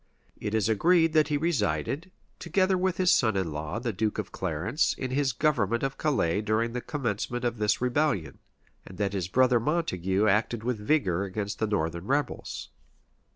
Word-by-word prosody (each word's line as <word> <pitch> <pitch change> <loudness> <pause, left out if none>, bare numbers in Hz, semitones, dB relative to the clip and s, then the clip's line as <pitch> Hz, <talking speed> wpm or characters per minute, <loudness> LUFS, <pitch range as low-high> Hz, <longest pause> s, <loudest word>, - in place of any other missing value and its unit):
It 105 0 -2
is 110 -2 +2
agreed 165 - +3
that 155 -2 +4
he 150 -2 0
resided, 140 - -1 0.3
together 190 -1 +1
with 185 0 0
his 185 -1 +3
son 110 - +3
in 90 -4 -1
law, 75 +5 -4
the 115 -1 -2
duke 105 +3 -1
of 105 -1 -4
Clarence, 95 - -1
in 130 -1 -4
his 135 0 +1
government 115 -4 +1
of 135 0 -2
Calais 105 - +1
during 110 +2 0
the 125 - -3
commencement 120 -3 -3
of 120 -2 -1
this 105 +1 +1
rebellion; 125 - 0 0.4
and 95 - -12
that 100 -1 -1
his 95 -3 -2
brother 125 +4 +3
Montague 105 - 0
acted 110 +2 +1
with 120 -2 -1
vigor 105 - +1
against 100 +1 -4
the 110 - +1
northern 85 -3 -2
rebels. 145 +2 -2
110 Hz, 175 wpm, -27 LUFS, 100-145 Hz, 0.4 s, that